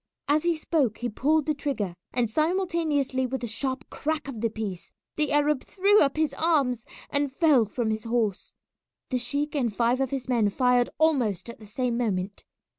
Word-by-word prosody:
As 295 +2 +3
he 345 0 +1
spoke 300 -8 0
he 240 - -3
pulled 295 +7 +1
the 305 - +1
trigger, 270 - -3 0.2
and 245 -2 +1
simultaneously 310 - 0
with 265 +1 -4
the - - -2
sharp 260 +4 -2
crack 310 -1 -2
of 240 -6 -6
the 230 - +1
piece 210 -5 -5 0.2
the 300 -1 +1
Arab 295 -1 +2
threw 405 +2 +3
up 275 0 +2
his 315 -1 +1
arms 275 -8 +1 0.2
and 285 -1 +1
fell 280 -5 +4
from 220 +1 -2
his 215 0 -3
horse. 225 -4 -1 0.6
The 255 - +1
sheik 285 +4 -1
and 255 -6 0
five 235 +4 +1
of 265 - 0
his 265 -1 -4
men 235 -5 +2
fired 250 +2 +2
almost 240 - +1
at - - -15
the 215 - -12
same 240 +2 -1
moment. 200 -4 -2
260 Hz, 190 wpm, -26 LUFS, 230-300 Hz, 0.6 s, fell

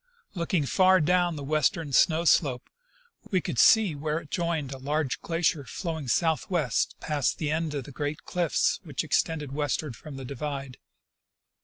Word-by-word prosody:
Looking 170 -3 0
far 185 +5 +4
down 175 +1 +2
the 145 - -6
western 155 +1 0
snow 160 +5 +4
slope, 135 -6 +2 0.6
we 185 - +2
could 120 - -3
see 220 -7 +6
where 150 +1 -2
it 155 -3 -8
joined 170 -6 -1
a 135 - -6
large 145 0 -1
glacier 165 -2 0
flowing 160 +2 -5
southward 160 - 0 0.3
past 150 -4 -1
the 150 -2 -2
end 160 -1 -1
of 140 - -3
the 145 - -11
great 145 +3 -4
cliffs 175 -3 0
which 150 -4 -3
extended 155 -1 0
westward 145 -2 -2
from 145 +1 -10
the 135 - -7
divide. 140 0 -5
155 Hz, 160 wpm, -27 LUFS, 140-170 Hz, 0.6 s, see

